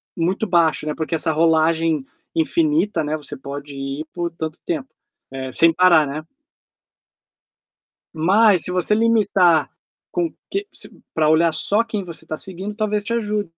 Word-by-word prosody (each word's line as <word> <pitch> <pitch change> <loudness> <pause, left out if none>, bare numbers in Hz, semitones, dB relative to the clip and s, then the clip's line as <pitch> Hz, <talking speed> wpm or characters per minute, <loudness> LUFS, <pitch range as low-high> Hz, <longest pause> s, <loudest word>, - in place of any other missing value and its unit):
Muito 185 +6 -1
baixo, 165 -4 +2
né, 150 - -2
porque 160 +1 -2
essa 160 0 +1
rolagem 160 -2 +2 0.3
infinita, 310 - +1
né, 150 +1 -2
você 145 -1 -7
pode 140 +1 -8
ir 135 +3 -5
por 175 -1 -2
tanto 160 -1 -6
tempo, 300 -6 -3 0.4
eh, 130 -1 -5
sem 165 0 +4
parar, 170 -4 +5
né. 145 +3 -5 1.9
Mas 185 +3 +4
se 180 - +1
você 180 +3 +2
limitar 200 -8 +3 0.4
com 345 -2 -1 0.2
que 400 +1 -3
se - - -5 0.2
pra 155 -1 +2
olhar 160 +1 +3
só 205 +7 +2
quem 215 -3 -4
você 170 -2 -7
tá 160 - -4
seguindo, 195 +3 -3
talvez 210 -1 -1
te 230 +3 -2
ajude. 210 -5 -2
170 Hz, 155 wpm, -21 LUFS, 155-210 Hz, 1.9 s, parar